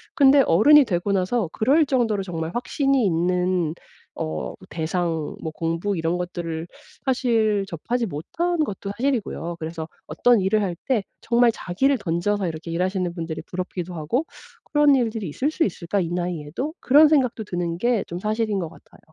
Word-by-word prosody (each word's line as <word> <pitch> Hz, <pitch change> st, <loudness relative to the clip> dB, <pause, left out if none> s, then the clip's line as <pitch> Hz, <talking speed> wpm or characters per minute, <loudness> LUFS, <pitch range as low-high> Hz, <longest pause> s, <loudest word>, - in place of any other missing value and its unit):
근데 280 Hz, -2 st, +6 dB
어른이 290 Hz, -, +6 dB
되고 190 Hz, -2 st, -1 dB
나서 195 Hz, +2 st, +1 dB
그럴 285 Hz, +8 st, +3 dB
정도로 230 Hz, -7 st, +1 dB
정말 165 Hz, -3 st, -4 dB
확신이 270 Hz, +1 st, +1 dB
있는 180 Hz, -1 st, +1 dB, 0.4 s
어 75 Hz, -5 st, -4 dB, 0.2 s
대상 165 Hz, -1 st, -2 dB
뭐 160 Hz, -, -3 dB
공부 165 Hz, +5 st, -1 dB
이런 165 Hz, +1 st, 0 dB
것들을 170 Hz, -2 st, -4 dB, 0.4 s
사실 225 Hz, -6 st, +2 dB
접하지 230 Hz, +8 st, -2 dB
못한 335 Hz, -, -1 dB
것도 200 Hz, -6 st, -5 dB
사실이고요. 230 Hz, -10 st, -2 dB
그래서 160 Hz, 0 st, -5 dB, 0.2 s
어떤 240 Hz, -4 st, +3 dB
일을 205 Hz, +3 st, +2 dB
할 180 Hz, -3 st, -2 dB
때 245 Hz, -7 st, +2 dB, 0.2 s
정말 235 Hz, 0 st, +4 dB
자기를 265 Hz, +12 st, +1 dB
던져서 185 Hz, +3 st, 0 dB
이렇게 165 Hz, 0 st, -5 dB
일하시는 180 Hz, +1 st, -1 dB
분들이 165 Hz, -2 st, -5 dB
부럽기도 180 Hz, -1 st, -5 dB
하고 175 Hz, -, -1 dB, 0.5 s
'그런 295 Hz, -1 st, +6 dB
일들이 225 Hz, -7 st, -1 dB
있을 270 Hz, -, -1 dB
수 325 Hz, -, +1 dB
있을까? 185 Hz, 0 st, -1 dB
이 170 Hz, -, -2 dB
나이에도?' 175 Hz, -, -3 dB
그런 295 Hz, +4 st, +6 dB
생각도 255 Hz, -7 st, +2 dB
드는 175 Hz, -4 st, -3 dB
게 235 Hz, +1 st, +1 dB
좀 175 Hz, -, -5 dB
사실인 215 Hz, +1 st, -1 dB
것 170 Hz, -3 st, -3 dB
같아요. -, -, -19 dB
190 Hz, 350 characters per minute, -23 LUFS, 170-245 Hz, 0.5 s, 근데